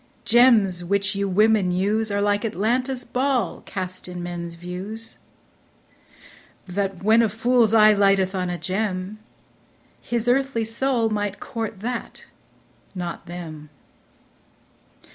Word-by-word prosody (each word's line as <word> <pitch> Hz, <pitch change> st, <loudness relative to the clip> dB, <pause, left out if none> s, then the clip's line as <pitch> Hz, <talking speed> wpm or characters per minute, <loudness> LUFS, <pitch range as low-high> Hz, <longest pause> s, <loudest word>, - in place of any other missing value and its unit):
Gems 220 Hz, -7 st, +4 dB
which 200 Hz, +2 st, 0 dB
you 200 Hz, 0 st, -1 dB
women 210 Hz, 0 st, +3 dB
use 205 Hz, +5 st, 0 dB
Are 200 Hz, 0 st, 0 dB
like 205 Hz, +1 st, +1 dB
Atlanta's 245 Hz, +5 st, -1 dB
ball 255 Hz, -7 st, -1 dB
cast 185 Hz, -1 st, -5 dB
in 180 Hz, -1 st, -6 dB
men's 170 Hz, -1 st, -5 dB
views; 190 Hz, +6 st, -5 dB, 1.5 s
That, 190 Hz, 0 st, -3 dB
when 220 Hz, +3 st, +5 dB
a 225 Hz, -, +2 dB
fool's 230 Hz, +1 st, +2 dB
eye 215 Hz, -1 st, +7 dB
lighteth 195 Hz, -2 st, +3 dB
on 180 Hz, -2 st, -2 dB
a 175 Hz, -, -3 dB
gem, 190 Hz, +1 st, -3 dB, 0.8 s
His 235 Hz, 0 st, -2 dB
earthly 255 Hz, -2 st, +1 dB
soul 230 Hz, 0 st, 0 dB
might 205 Hz, -2 st, -2 dB
court 225 Hz, -4 st, -5 dB
that, 240 Hz, +1 st, -5 dB, 0.7 s
not 175 Hz, -2 st, -5 dB
them. 160 Hz, -3 st, -8 dB
205 Hz, 120 wpm, -23 LUFS, 185-225 Hz, 1.5 s, eye